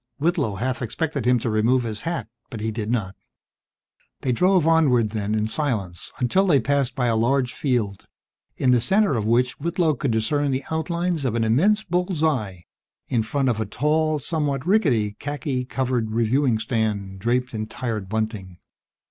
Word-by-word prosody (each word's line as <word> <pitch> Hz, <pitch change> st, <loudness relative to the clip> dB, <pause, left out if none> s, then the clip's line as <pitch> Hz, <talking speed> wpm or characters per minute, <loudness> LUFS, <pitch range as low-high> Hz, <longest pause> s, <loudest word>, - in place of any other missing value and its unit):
Whitlow 150 Hz, -, 0 dB
half 125 Hz, +4 st, -2 dB
expected 140 Hz, +2 st, -2 dB
him 125 Hz, 0 st, +5 dB
to 120 Hz, 0 st, -2 dB
remove 120 Hz, +4 st, +2 dB
his 110 Hz, -2 st, -4 dB
hat, 165 Hz, -10 st, -3 dB, 0.2 s
but 115 Hz, -, -7 dB
he 110 Hz, +1 st, -2 dB
did 110 Hz, -1 st, -4 dB
not. 105 Hz, -6 st, -1 dB, 1.1 s
They 130 Hz, -, 0 dB
drove 180 Hz, +5 st, +3 dB
onward, 130 Hz, -10 st, +3 dB
then, 105 Hz, -1 st, -2 dB
in 110 Hz, 0 st, 0 dB
silence, 110 Hz, -, -3 dB
until 185 Hz, +11 st, +2 dB
they 150 Hz, -6 st, +5 dB
passed 140 Hz, +1 st, 0 dB
by 130 Hz, -3 st, 0 dB
a 115 Hz, -2 st, +2 dB
large 125 Hz, +2 st, +1 dB
field, 115 Hz, -8 st, -1 dB, 0.5 s
in 130 Hz, -, +3 dB
the 125 Hz, -2 st, +4 dB
center 200 Hz, -, +2 dB
of 110 Hz, -2 st, -1 dB
which 125 Hz, +2 st, +1 dB
Whitlow 170 Hz, +1 st, +1 dB
could 140 Hz, -, -2 dB
discern 120 Hz, +6 st, +1 dB
the 130 Hz, 0 st, -1 dB
outlines 170 Hz, 0 st, -1 dB
of 125 Hz, -4 st, -1 dB
an 115 Hz, -, +1 dB
immense 190 Hz, -, +3 dB
bull's 180 Hz, -2 st, -1 dB
eye, 105 Hz, -, -1 dB, 0.4 s
in 120 Hz, -, +2 dB
front 130 Hz, +5 st, -1 dB
of 115 Hz, -3 st, +1 dB
a 110 Hz, -, -1 dB
tall, 155 Hz, +6 st, +1 dB
somewhat 145 Hz, -2 st, -2 dB
rickety 125 Hz, -, +2 dB
khaki 140 Hz, -3 st, -3 dB
colored 125 Hz, -3 st, -1 dB
reviewing 115 Hz, +2 st, +2 dB
stand, 110 Hz, -4 st, -2 dB
draped 125 Hz, +4 st, 0 dB
in 110 Hz, -1 st, -3 dB
tired 110 Hz, -4 st, -4 dB
bunting. 110 Hz, -4 st, -3 dB
125 Hz, 175 wpm, -23 LUFS, 110-150 Hz, 1.1 s, him